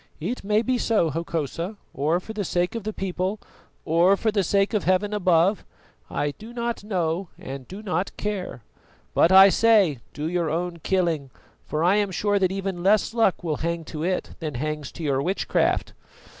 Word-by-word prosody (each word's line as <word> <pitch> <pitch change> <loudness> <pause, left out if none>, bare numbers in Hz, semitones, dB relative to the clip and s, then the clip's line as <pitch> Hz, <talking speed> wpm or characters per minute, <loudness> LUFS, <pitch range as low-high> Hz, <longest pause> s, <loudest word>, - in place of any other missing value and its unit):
"It 205 +11 -4
may 210 +2 +2
be 250 0 0
so, 210 -10 +2
Hokosa, 165 +4 -3 0.2
or 155 +6 +1
for 220 +4 -8
the 210 -2 -2
sake 175 0 0
of 230 -3 -5
the 215 - -1
people, 190 +1 -3 0.5
or 175 +5 +4
for 220 - 0
the 205 -1 +1
sake 195 +3 +1
of 210 - +1
Heaven 185 +3 +2
above 185 0 +3 0.5
I 145 - -1
do 220 +9 -12
not 235 -2 -3
know 180 -3 -1
and 135 -1 -8
do 200 +3 -9
not 185 -2 -2
care; 195 - -4 0.5
but 165 - +4
I 190 +1 +9
say, 200 - +4
do 150 - -5
your 170 -1 0
own 170 +2 -2
killing, 165 -6 0 0.4
for 155 +1 -1
I 185 +4 +4
am 205 -1 +1
sure 205 +2 +1
that 185 -1 +2
even 195 -2 -3
less 205 +4 +3
luck 225 -7 +2
will 155 -4 -1
hang 170 +1 -2
to 155 - -4
it 185 +3 -1
than 155 -5 -4
hangs 150 +2 -3
to 170 - -8
your 135 -3 +1
witchcraft." 185 +7 0
185 Hz, 185 wpm, -24 LUFS, 165-205 Hz, 0.5 s, I